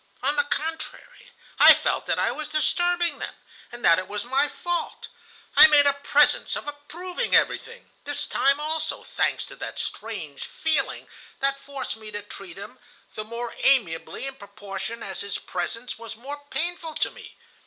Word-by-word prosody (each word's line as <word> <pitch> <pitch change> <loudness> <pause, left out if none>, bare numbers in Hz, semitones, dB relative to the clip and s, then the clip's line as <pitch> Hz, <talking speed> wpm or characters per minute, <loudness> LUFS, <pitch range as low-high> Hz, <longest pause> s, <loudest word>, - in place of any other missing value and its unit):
On 285 +3 +2
the 290 -1 +2
contrary, 320 +11 -5 0.3
I - - +11
felt - - -1
that - - +1
I - - +2
was 310 -1 -4
disturbing 345 +3 +1
them, - - -5 0.4
and 240 0 -5
that 165 - +7
it 185 - -5
was 210 +2 -3
my 270 +4 +2
fault. 345 +2 -3 0.5
I - - +11
made 295 -2 +6
a 285 - +5
presence 285 +1 +3
of - - -5
approving 320 +5 -2
everything, 475 +1 +1
this 290 0 -1
time 275 +1 +2
also, 310 +1 -2
thanks - - 0
to - - -11
that - - -6
strange 195 -11 -5
feeling 310 -4 -1 0.3
that 275 0 +1
forced 275 -4 -6
me 220 -1 -10
to 205 -1 -5
treat 195 -3 -10
him 240 +6 -9 0.3
the 215 - -4
more 235 +2 -5
amiably 215 -7 +2
in 270 0 -6
proportion 200 +2 -7
as 190 - -5
his 200 -1 -3
presence 225 +8 -4
was 230 -1 -8
more 285 +4 -8
painful 335 -1 -3
to - - +1
me. - - -13
275 Hz, 170 wpm, -25 LUFS, 215-305 Hz, 0.5 s, I